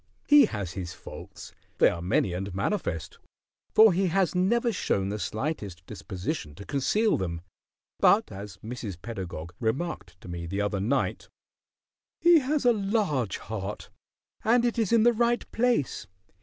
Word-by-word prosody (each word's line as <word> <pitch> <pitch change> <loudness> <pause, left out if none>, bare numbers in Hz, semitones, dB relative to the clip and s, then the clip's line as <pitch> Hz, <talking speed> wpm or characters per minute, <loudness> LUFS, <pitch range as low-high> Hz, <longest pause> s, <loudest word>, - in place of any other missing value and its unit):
He 290 -2 +8
has 100 - -4
his 90 -1 -5
faults; - - -11 0.2
they - - +6
are 85 - -1
many 90 +1 +1
and 95 +1 -4
manifest, 95 - -2 0.5
for 220 -3 +7
he 190 +2 +1
has 185 0 +1
never 230 +7 +2
shown 100 - -1
the 105 +1 -3
slightest 100 - -4
disposition 95 - -5
to 100 - -10
conceal 210 - +1
them, 85 -3 -3 0.6
but, - - +4
as 100 -1 -8
Mrs. 110 -6 -6
Pedagog 90 -6 -6
remarked 110 - -3
to - - -12
me 85 -1 -5
the 100 +4 -3
other 105 -1 0
night, 130 +8 -1 0.9
"He 345 -1 +6
has 285 0 -1
a 240 - +6
large 195 - 0
heart, 105 -2 -6 0.5
and 235 +2 +4
it 240 0 0
is 220 -5 +1
in 230 -2 +5
the 240 +1 +5
right 235 +1 +1
place. 230 - 0
115 Hz, 155 wpm, -27 LUFS, -, 0.9 s, He